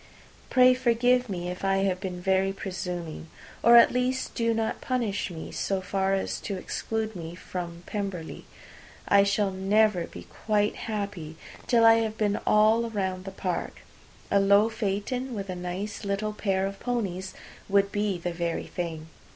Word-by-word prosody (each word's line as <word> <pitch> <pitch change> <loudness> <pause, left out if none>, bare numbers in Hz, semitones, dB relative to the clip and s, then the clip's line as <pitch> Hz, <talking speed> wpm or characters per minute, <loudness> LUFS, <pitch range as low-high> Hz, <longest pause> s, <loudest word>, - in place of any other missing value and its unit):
Pray 255 0 +6
forgive 250 0 +2
me, 175 -2 -3
if 180 +1 -6
I 195 0 +2
have 185 -1 0
been 185 -2 -4
very 190 +1 +2
presuming, 180 -4 -5 0.3
or 235 0 +8
at 235 - +7
least 255 +1 -1
do 230 -1 +1
not 225 -1 -1
punish 230 -7 -1
me 165 -3 -7
so 195 -1 -1
far 190 +1 0
as 195 - -2
to 200 - -4
exclude 220 +3 -3
me 165 -1 -7
from 175 -1 -6
P. 195 -6 -5 0.6
I 200 - +6
shall 200 0 +1
never 195 -1 +2
be 90 - -10
quite 210 - 0
happy 200 -8 -5 0.3
till 230 -2 +4
I 225 0 +8
have 220 -1 -2
been 205 -1 +1
all 220 +2 +4
round 190 -3 -3
the 195 - -5
park. 185 -2 -4 0.5
A 200 - +5
low 200 +2 +5
phaeton 225 +4 -2
with 195 -2 -4
a - - -4
nice 180 +5 -5
little 200 +1 -2
pair 195 -2 0
of 195 0 -5
ponies 190 -7 -3 0.3
would 200 0 +3
be 205 -2 0
the 175 0 -4
very 170 -1 -2
thing. 165 -3 -5
200 Hz, 165 wpm, -27 LUFS, 185-220 Hz, 0.6 s, or